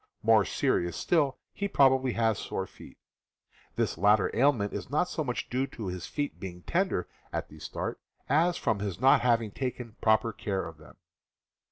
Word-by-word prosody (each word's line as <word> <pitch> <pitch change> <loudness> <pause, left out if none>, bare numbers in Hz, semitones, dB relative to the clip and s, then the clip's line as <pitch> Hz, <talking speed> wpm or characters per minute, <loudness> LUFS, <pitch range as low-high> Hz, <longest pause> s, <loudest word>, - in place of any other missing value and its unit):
More - - +5
serious 85 0 0
still, 150 -6 +1 0.2
he 200 - -2
probably 130 -6 +4
has 115 -3 +1
sore - - -3
feet. - - -14 0.8
This - - -1
latter 105 +1 +3
ailment 120 -6 +2
is - - -5
not 150 +6 +1
so 155 - -2
much 125 -4 -3
due 130 +2 -1
to 110 -7 -6
his 90 -1 -5
feet 145 -1 -3
being 90 -2 -8
tender 180 - 0 0.2
at - - -3
the - - -13
start - - -4 0.3
as 170 +5 +3
from 105 - 0
his 100 -3 -4
not 135 +2 +5
having 115 -3 +2
taken 125 -2 -5
proper 110 +1 +3
care 95 -3 -2
of 80 -1 -11
them. 75 - -15
115 Hz, 175 wpm, -29 LUFS, 100-140 Hz, 0.8 s, More